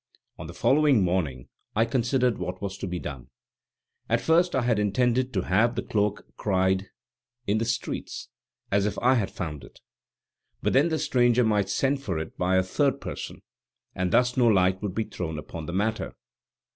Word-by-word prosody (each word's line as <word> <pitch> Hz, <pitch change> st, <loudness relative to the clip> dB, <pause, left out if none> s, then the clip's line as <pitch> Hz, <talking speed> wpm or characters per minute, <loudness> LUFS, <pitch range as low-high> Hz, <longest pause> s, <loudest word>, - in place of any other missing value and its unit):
On -, -, -6 dB
the -, -, -8 dB
following 140 Hz, -6 st, +4 dB
morning 80 Hz, -9 st, -1 dB, 0.3 s
I 115 Hz, +2 st, +4 dB
considered 125 Hz, 0 st, +1 dB
what -, -, -4 dB
was 100 Hz, -1 st, -4 dB
to -, -, -4 dB
be 90 Hz, 0 st, -3 dB
done. 65 Hz, -6 st, -7 dB, 0.8 s
At -, -, +3 dB
first 170 Hz, +1 st, +3 dB
I 130 Hz, -, +1 dB
had 115 Hz, -3 st, +2 dB
intended 125 Hz, +5 st, +1 dB
to 95 Hz, -, +1 dB
have 115 Hz, +6 st, +2 dB
the -, -, -2 dB
cloak 105 Hz, -1 st, -1 dB
cried 95 Hz, -1 st, +1 dB, 0.6 s
in 105 Hz, +2 st, +1 dB
the 115 Hz, -, 0 dB
streets, 115 Hz, 0 st, -3 dB, 0.4 s
as 100 Hz, +1 st, +2 dB
if 105 Hz, -, -3 dB
I 125 Hz, +2 st, +4 dB
had 110 Hz, -7 st, +1 dB
found 75 Hz, -5 st, -6 dB
it. -, -, -15 dB, 0.8 s
But -, -, +1 dB
then 145 Hz, +6 st, +4 dB
the 160 Hz, -, 0 dB
stranger 125 Hz, -5 st, +3 dB
might 105 Hz, -3 st, +1 dB
send 135 Hz, 0 st, +1 dB
for 95 Hz, -10 st, -3 dB
it 80 Hz, 0 st, -5 dB
by 90 Hz, +1 st, +1 dB
a 95 Hz, -, +3 dB
third 135 Hz, +9 st, +1 dB
person, -, -, -7 dB, 0.5 s
and 90 Hz, -1 st, -1 dB
thus 125 Hz, +4 st, +3 dB
no 125 Hz, -2 st, +4 dB
light 95 Hz, -3 st, +3 dB
would 100 Hz, -4 st, -4 dB
be 110 Hz, -, +1 dB
thrown 80 Hz, -6 st, -5 dB
upon 80 Hz, +1 st, -7 dB
the -, -, -3 dB
matter. 110 Hz, +4 st, -1 dB
105 Hz, 185 wpm, -26 LUFS, 95-125 Hz, 0.8 s, following